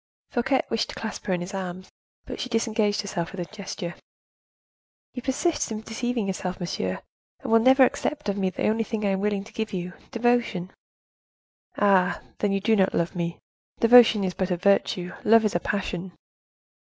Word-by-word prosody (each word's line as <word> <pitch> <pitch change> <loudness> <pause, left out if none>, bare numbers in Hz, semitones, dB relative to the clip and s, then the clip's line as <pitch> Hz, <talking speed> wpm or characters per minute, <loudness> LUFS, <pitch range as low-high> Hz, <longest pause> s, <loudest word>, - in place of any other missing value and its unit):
Fouquet 265 +2 +1
wished 225 -1 0
to - - -7
clasp 220 -1 -6
her 190 - +1
in 175 - -1
his 175 +3 -6
arms, 185 -1 -6 0.3
but - - -7
she 255 - -3
disengaged 220 -2 +1
herself 175 -4 -4
with 190 - -8
a 175 +4 -8
gesture. 190 -3 -5 1.2
"You 250 - -5
persist 270 +3 0
in 215 -1 -3
deceiving 230 0 -2
yourself, 185 -1 -3
monsieur, 95 - -3 0.4
and - - -4
will 225 - +7
never 260 +3 +6
accept 300 +2 0
of 200 - 0
me 195 -2 0
the - - -2
only 220 +1 +1
thing 220 -1 -3
I - - +2
am 190 -1 0
willing 205 -1 0
to 205 - -15
give 220 -1 -3
you—devotion." 190 +1 -1 1.1
"Ah, 195 -3 +3 0.2
then, 205 - +1
you 195 - +1
do 220 +3 +2
not 190 -2 +2
love 170 +1 0
me? 170 -1 -2 0.4
Devotion 230 -3 +7
is 185 -1 -1
but 185 +1 -2
a 180 - 0
virtue, 185 -1 +1
love 225 0 +5
is 210 - +1
a 175 - +1
passion." 185 -2 -3
205 Hz, 185 wpm, -25 LUFS, 185-225 Hz, 1.2 s, will